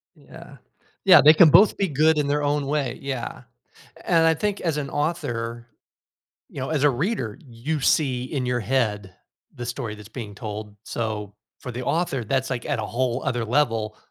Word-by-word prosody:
Yeah. - - -14 0.5
Yeah, - - +9
they 155 - +9
can 160 0 +7
both 200 +8 +6
be 195 - +1
good 155 +2 +3
in 145 - +1
their 145 +1 0
own 145 -1 0
way, 140 -4 -2
yeah, 135 -3 -5 0.6
and 165 -1 +3
I 160 - +4
think 205 +4 -2
as 160 -4 -1
an 140 -2 -3
author 120 -7 -3 0.8
you - - -7
know, 130 - -3
as 150 -2 0
a 145 - +6
reader, 135 - -2
you 135 +4 -4
see 130 -4 +1
in 130 -1 -3
your 125 -1 0
head 105 -5 -1 0.4
the 120 - -6
story 120 -2 -4
that's 105 -1 -12
being 105 -3 -8
told, 105 -1 -7
so, 105 -3 -4 0.3
for 125 - -6
the 125 +1 -5
author 150 -2 -1
that's 130 +3 -1
like, 125 -2 -3
at 140 -7 -1
a - - -3
whole 125 +2 -1
other 120 -2 -1
level 115 -4 0
130 Hz, 185 wpm, -24 LUFS, 115-150 Hz, 0.8 s, Yeah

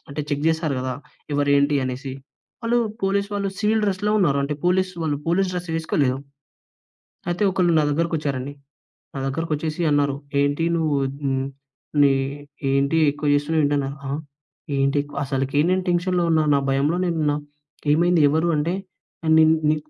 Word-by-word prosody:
అంటే 140 +1 -4
చెక్ 145 0 -1
జేస్తారు 160 -3 +1
గదా! 130 0 -2 0.4
ఎవరేంటి 145 0 +3
అనేసి. 130 +1 -4 0.5
వాళ్ళు 235 +1 +2 0.2
పోలీస్ 200 +1 +1
వాళ్ళు 200 -1 -1
సివిల్ 220 +1 +2
డ్రెస్‌లో 200 +1 0
ఉన్నారు. 150 -8 +2
అంటే, 145 +2 -2
పోలీస్ 185 +1 +2
వాళ్ళు 150 -2 0
పోలీస్ 185 +3 +2
డ్రెస్ 180 -1 -4
వేసుకోలేదు. 145 -5 0 1.1
అయితే, 175 +3 -1
ఒకళ్ళు 180 -2 +2
నా - - +4
దగ్గరకొచ్చారండి. 145 -4 -1 0.6
నా - - -4
దగ్గరకొచ్చేసి 155 +3 -2
అన్నారు, 145 -1 +2 0.2
"ఏంటి 145 +3 +1
నువ్వు 155 -3 +1 0.3
హ్మ్, 135 -1 0 0.6
నీ 140 - +6 0.6
ఏంటి 140 +4 +2
ఎక్కువ 145 +1 -3
జేస్తున్నావు? 155 +2 +1
ఏంటన్నారు." 140 -1 -1
ఆ! - - -3 0.7
ఏంటి? 140 +1 +2 0.2
అసలికీ 135 +2 0
నేను 185 0 +1
టెన్షన్‌లో 175 0 +1
ఉన్నా. 160 -1 +3
నా 140 - +3
భయంలో 145 +6 +1
నేనున్నా. 155 -4 0 0.6
ఏమైంది? 170 0 +3
ఎవరు? 160 +3 +1
అంటే, 165 +5 0 0.5
"ఏ - - 0
నిన్ 160 0 +6 0.2
నీ 155 - +3
155 Hz, 145 wpm, -23 LUFS, 140-175 Hz, 1.1 s, నీ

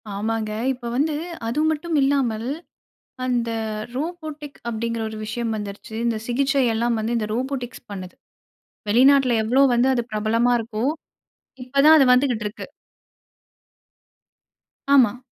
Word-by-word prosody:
ஆமாங்க. 220 +1 -2 0.2
இப்போ 245 -1 -8
வந்து 300 +3 +1 0.3
அது 240 +6 -1
மட்டும் 315 +1 -2
இல்லாமல், 250 -5 +1 0.8
அந்த 240 -2 0 0.5
ரோபோடிக் 310 -1 -6
அப்பிடிங்கிற 230 0 -2
ஒரு 220 - -7
விஷயம் 225 +1 -3
வந்துருச்சு. 205 +1 -7
இந்த 230 -2 0
சிகிச்சை 270 +2 +1
எல்லாம் 235 +1 0
வந்து 230 +2 -1
இந்த 215 -2 -2
ரோபோடிக்ஸ் 255 -1 -4
பண்ணுது. 185 -2 -7 0.8
வெளிநாட்ல 260 +1 +5
எவ்ளோ 260 +5 +3
வந்து 245 +2 +3
அது 240 - 0
பிரபலமா 225 +3 +1
இருக்கோ! 225 0 -4 0.8
இப்ப 255 +2 -18
தான் 315 +1 +9
அது 275 - +6
வந்துக்கிட்டு 250 -5 +1
இருக்கு. 210 - -8 2.3
ஆமா. 245 -3 +5
240 Hz, 120 wpm, -22 LUFS, 225-275 Hz, 2.3 s, தான்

